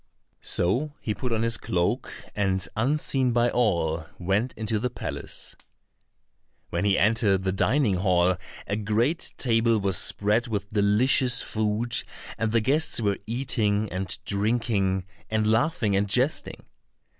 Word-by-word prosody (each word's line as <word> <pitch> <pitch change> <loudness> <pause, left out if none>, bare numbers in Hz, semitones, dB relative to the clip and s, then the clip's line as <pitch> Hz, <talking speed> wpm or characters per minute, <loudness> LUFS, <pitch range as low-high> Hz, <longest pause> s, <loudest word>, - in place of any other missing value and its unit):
So 125 - 0
he 105 - -2
put 125 +3 -4
on 115 0 0
his 115 -1 +1
cloak, 85 0 -1 0.2
and 95 -3 0
unseen 130 +1 0
by 120 0 +2
all 85 -8 0
went 100 +7 0
into 110 0 -2
the 125 +3 -1
palace. - - -5 1.2
When - - -1
he 100 -1 +3
entered 105 -2 +2
the 95 - 0
dining 105 +1 +1
hall 90 -1 +2 0.3
a 100 - -2
great 110 +9 0
table 115 -2 +2
was 95 -3 +3
spread 105 +4 +2
with 105 -2 -4
delicious 115 +5 +3
food, 110 +2 -1 0.4
and 110 -1 0
the 115 0 +2
guests 145 +6 +2
were 100 -3 0
eating 110 -4 0
and 95 +2 -2
drinking, 100 -3 0 0.2
and 110 0 0
laughing, 110 -2 +1
and 100 +1 0
jesting. 130 +8 -1
110 Hz, 135 wpm, -26 LUFS, 100-120 Hz, 1.2 s, he